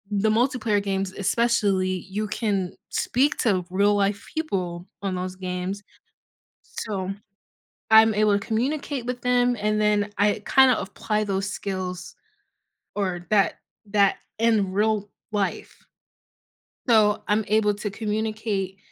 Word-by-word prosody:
the 215 +2 +2
multiplayer 225 -3 +1
games, 195 -1 -1
especially, 200 -2 +1 0.2
you 210 +2 -2
can 200 -3 -1 0.2
speak 275 +5 +1
to 185 -6 +1
real 205 +2 +3
life 200 +1 0
people 180 - -3 0.2
on 195 -2 -2
those 185 0 -4
games, 185 +2 -4 0.8
so, 195 -3 -5 0.8
I'm 220 0 +7
able 210 0 +3
to 200 - -9
communicate 260 +3 -1
with 245 0 -4
them, 245 0 +2
and 215 0 +1
then 210 -1 +2
I 205 +1 +2
kinda 265 -3 +5
apply 210 +2 -2
those 195 -1 -1
skills, 185 -2 -5 0.8
or 180 -3 -2
that 205 -2 +3 0.3
that 200 -1 +3 0.2
in 220 -4 +2
real 210 0 +1 0.2
life, 205 -2 -2 1.1
so, 215 -3 +4
I'm 210 +1 +2
able 210 0 +3
to 205 0 -4
communicate 215 -2 -2
205 Hz, 125 wpm, -24 LUFS, 195-220 Hz, 1.1 s, I'm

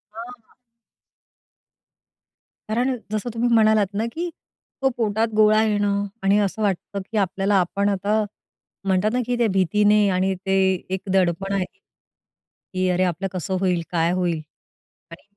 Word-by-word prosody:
हां, 225 - -6
हां. 230 -3 -31 2.2
कारण 250 +4 +1 0.2
जसं 215 +2 -2
तुम्ही 240 +1 0
म्हणालात 215 -2 +4
ना, 215 +3 -1
की 345 +2 -3 0.5
तो 270 - +3
पोटात 220 0 +1
गोळा 215 0 +5
येणं 205 -2 +1 0.2
आणि 195 +1 +4
असं 205 +2 -1
वाटतं 200 0 -1
की 220 - -2
आपल्याला 195 +1 +1
आपण 200 +3 0
आता 205 +2 +1 0.6
म्हणतात 190 +3 +2
ना 250 - +1
की 245 0 -1
त्या 235 - +2
भीतीने 210 +3 +3
आणि 190 +1 +1
ते 190 - 0 0.4
एक 190 - -2
दडपण 190 +1 +1
आहे 190 -2 0 1.1
की 185 0 0
अरे 180 +1 +2
आपलं 185 +2 -1
कसं 185 +1 -2
होईल, 180 -3 +1
काय 170 0 +1
होईल? 175 -3 -1 0.7
आणि 170 - -12
200 Hz, 145 wpm, -22 LUFS, 185-215 Hz, 2.2 s, गोळा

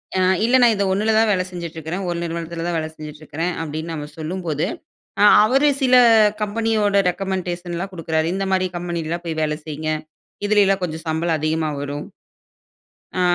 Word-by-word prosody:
அ, - - +2 0.2
இல்ல. 245 +3 +3
நான் 235 -2 +6
இது 200 - 0
1ல 210 +3 +1
தான் 220 -1 +4
வேலை 185 -2 +1
செஞ்சுட்டு 170 -2 -7
இருக்கிறேன். 160 +5 -4
ஒரு 170 - -2
நிறுவனத்தில 170 0 -4
தான 175 - -1
வேலை 155 -1 -2
செஞ்சுட்டு 150 0 -9
இருக்கிறேன் 165 +4 -3
அப்பிடின்னு 160 +1 -5
நம்ம 150 -2 -5
சொல்லும்போது, 160 -2 -2 0.6
அ - - +6 0.2
அவரு 270 +6 +3
சில 255 -1 +4 0.5
கம்பெனியோட 210 -1 +1
ரெக்கமெண்டேஷன்லாம் 180 -1 -3
குடுக்கிறாரு. 160 -2 -1
இந்தமாரி 190 -1 0
கம்பெனிலலாம் 170 -1 -3
போய் 160 -1 -3
வேலை 150 -1 0
செய்யுங்க. 155 0 -3 0.5
இதில 210 0 +4
எல்லாம் 195 - +3
கொஞ்சம் 160 -1 -4
சம்பளம் 160 0 0
அதிகமா 155 +1 0
வரும். 145 +1 -5 1.1
அ, - - +2
170 Hz, 160 wpm, -21 LUFS, 160-195 Hz, 1.1 s, நான்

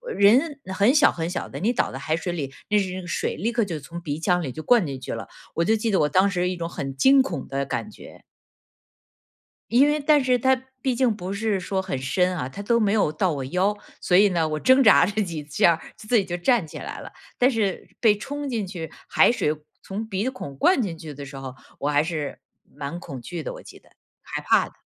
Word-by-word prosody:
呃， - - -6
人 260 +9 +4 0.2
很 200 +6 +4
小 295 0 +5
很 165 0 -3
小 180 - -4
的。 - - -7
你 225 +6 +2
倒 - - 0
在 135 - -5
海 155 +3 -1
水 175 +2 -3
里， 140 -6 -4 0.2
那 210 - +3
是 195 -3 +1
那 185 - -5
个 180 - -10
水 170 - -2
立 220 +8 -1
刻 235 -1 +1
就 170 -6 -4
从 165 +4 -8
鼻 150 -2 -3
腔 175 +2 +1
里 140 - -3
就 155 +5 -8
灌 240 -5 +4
进 135 -4 -5
去 130 - -5
了， 115 - -7 0.3
我 170 - +1
就 220 +5 +3
记 220 +1 -2
得 190 - +3
我 150 - +3
当 185 +6 +3
时 180 -2 0
一 185 - -3
种 170 -1 -4
很 135 -5 -5
惊 270 - +6
恐 170 - -5
的 140 0 -2
感 140 - -3
觉。 215 - -14 1.5
因 255 +5 +5
为 300 +1 +2
但 295 0 +4
是 255 -1 +2
它 260 +2 +4 0.3
毕 260 0 0
竟 240 -2 +2
不 185 -1 -5
是 210 0 0
说 190 +1 -2
很 185 -8 -3
深 180 +7 0
啊， 130 -7 -3
它 200 +10 -8
都 235 +3 +2
没 210 -3 +2
有 210 -8 +2
到 170 +3 0
我 140 -3 -4
腰， 185 +7 +1 0.2
所 180 - +2
以 205 +2 +6
呢， 170 -4 0
我 155 0 -3
挣 260 +1 +5
扎 215 - +7
着 205 +4 -1
几 165 -6 -5
下 165 +2 +3 0.2
自 - - -13
自 240 - +3
己 200 - +3
就 175 - -3
站 205 +4 +2
起 - - -9
来 - - -7
了。 - - -9 0.3
但 250 +2 +4
是 215 -6 -2
被 215 -3 +5
冲 285 +6 -5
进 225 -6 -2
去 175 -4 -6 0.2
海 - - +5
水 150 -10 0 0.3
从 210 +3 -5
鼻 205 +3 -1
孔 145 - -7
灌 320 - +3
进 180 -6 -3
去 160 -2 -9
的 140 0 -8
时 140 0 -10
候， 135 -1 -7 0.3
我 145 - 0
还 145 0 +3
是 155 -4 -4 0.4
蛮 145 +4 -5
恐 135 -7 -8
惧 165 +7 -6
的， - - -5
我 - - -10
记 - - -13
得， - - -26 0.3
害 - - -5
怕 - - +4
的。 - - -24
185 Hz, 270 characters per minute, -24 LUFS, 155-225 Hz, 1.5 s, 扎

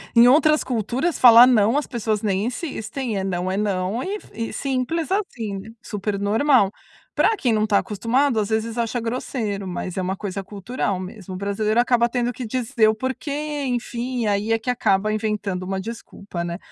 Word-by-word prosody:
Em 235 +1 +8
outras 305 +3 +5
culturas, 250 - -1
falar 240 0 +9
não, 230 +1 +4
as 295 - -1
pessoas 220 -4 -1
nem 200 -1 0
insistem, 250 - -4
é 190 - -1
não, 185 -1 -2
é - - -1
não, 200 +2 -1
e 390 +3 -3
f 420 - -11
e 225 +1 -4
simples 275 +5 -2
assim, 225 - -2 0.2
super 205 -1 -3
normal. 210 +1 +3 0.4
Para 440 -1 +2
quem 245 -5 +1
não 215 0 +2
tá 205 -2 +3
acostumado, 235 +5 +1
às 205 - -3
vezes 220 +1 -1
acha 235 +1 -1
grosseiro, 225 -3 -3
mas 180 0 -5
é 190 - -1
uma 185 +1 -2
coisa 195 -1 -4
cultural 200 0 -3
mesmo. 190 0 -8
O - - -5
brasileiro 210 +3 0
acaba 240 -1 +3
tendo 245 0 -1
que 250 - -6
dizer 230 -1 +1
o 220 - +1
porquê, 285 +4 -3
enfim, 245 0 -2
e - - 0
aí 205 +2 0
é 225 - +3
que 235 - -5
acaba 215 -3 +1
inventando 210 -4 -2
uma 190 +1 -3
desculpa, 200 -4 -7
né. 170 0 -4
225 Hz, 190 wpm, -22 LUFS, 200-250 Hz, 0.4 s, falar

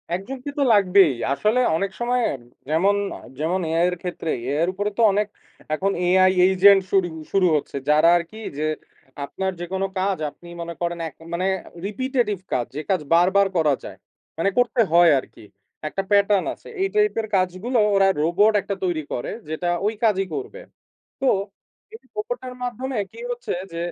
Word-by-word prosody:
একজনকে 255 +9 -6
তো - - +4
লাগবেই। 190 -6 +5 0.2
আসলে 215 - +1 0.2
অনেক 195 +3 -1
সময় 245 +1 +1 0.5
যেমন 190 +6 +3 0.4
যেমন 170 +5 0
AI-র 175 +2 +2
ক্ষেত্রেই। 165 -6 -3
AI 145 +4 +1
-র - - +1
উপরে 205 +2 -1
তো - - +2
অনেক 205 +1 +1 0.5
এখন 195 +5 0
AI 185 +1 +5 0.2
এজেন্ট 195 +1 +6
শুরু 190 -2 +3 0.3
শুরু 190 -2 +4
হচ্ছে। 140 -1 -3
যারা 155 +2 +5
আরকি 170 +5 -7 0.2
যে 150 - -2 0.6
আপনার 190 +5 -3
যেকোনো 190 +2 -2
কাজ 195 0 0
আপনি 170 +4 -17
মনে 170 0 -5
করেন 170 0 -2
এক 140 - -22 0.2
মানে 180 +2 -1 0.4
রিপিটেটিভ 240 -1 -1 0.2
কাজ 120 -2 +1
যে 150 - -2
কাজ 190 -4 +2
বারবার 190 +3 +4
করা 155 -3 +3
যায়, - - -9 0.4
মানে 180 +4 +2
করতে 245 0 +3
হয় 170 0 +6
আরকি, - - -13 0.4
একটা 195 - -2
প্যাটার্ন 200 -1 +4
আছে। - - -16
এই 385 - +3
টাইপের 420 - +2
কাজগুলো 185 +7 0 0.2
ওরা 195 0 +5
রোবট 190 +7 +3
একটা 200 - -4
তৈরি 175 -4 0
করে 120 - -3 0.2
যেটা 160 +3 -3 0.2
ওই 215 - +1
কাজই 195 -4 +3
করবে। 420 +4 -6 0.6
তো 270 - +1 0.7
এই 445 - -10
রোবটের 425 - -4
মাধ্যমে 250 0 -3
কি - - -13
হচ্ছে? 485 +1 -4 0.2
যে 165 - -5
195 Hz, 165 wpm, -23 LUFS, 175-220 Hz, 0.7 s, এজেন্ট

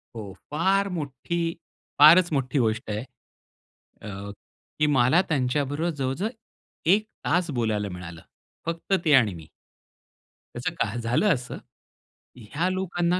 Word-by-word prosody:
हो. 100 -4 -7 0.2
फार 195 +5 +2
मोठी, 150 +4 -3 0.6
फारच 170 +4 +8
मोठी 135 0 0
गोष्ट 110 -1 0
आहे. 105 +1 -2 1.0
अ, 100 -1 -7 0.5
की 150 - +4
मला 135 +5 +4
त्यांच्याबरोबर 145 +3 0
जवळ-जवळ 135 +10 -2 0.6
1 215 +1 +1 0.2
तास 175 +1 +1
बोलायला 110 -5 -1
मिळालं. 90 -2 -8 0.5
फक्त 165 +3 -2
ते 150 - +4
आणि 110 -7 +5
मी. 80 -2 -11 1.1
त्याचं - - -3
काय 115 - -4
झालं 125 - +2
असं. 125 -2 -5 0.8
ह्या 145 - -2
लोकांना 180 -1 0
140 Hz, 120 wpm, -25 LUFS, 110-170 Hz, 1.1 s, फारच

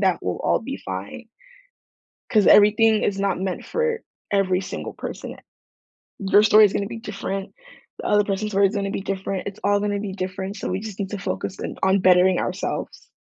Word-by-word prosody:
that, 190 -3 +2
we'll 90 - -2
all - - +2
be - - -6
fine 95 - -6 1.1
'cause 210 -3 +4
everything 215 +1 +6
is 195 -1 0
not 195 -2 0
meant 190 -1 -3
for 470 -1 -1 0.3
every 190 -2 +2
single - - -6
person. - - -7 0.8
Their 200 +1 +4
story 215 0 +7
is 200 - +3
gonna 200 - -1
be 230 -1 -6
different, 195 -3 -5 0.5
the - - -5
other 210 0 +3
person's 205 +1 -2
story 200 -1 +4
is 200 - -3
gonna 200 -1 -1
be - - -3
different, 195 0 -4
it's 200 - -6
all 205 0 +3
gonna 205 0 -1
be 200 -2 -4
different, 190 +1 -5
so - - -4
we 185 +2 -2
just 215 -2 -8
need 195 -1 -3
to 205 - -4
focus 190 - -4
in - - -5
on 190 +1 +3
bettering 185 0 +5
ourselves. - - -4
195 Hz, 195 wpm, -23 LUFS, 190-210 Hz, 1.1 s, story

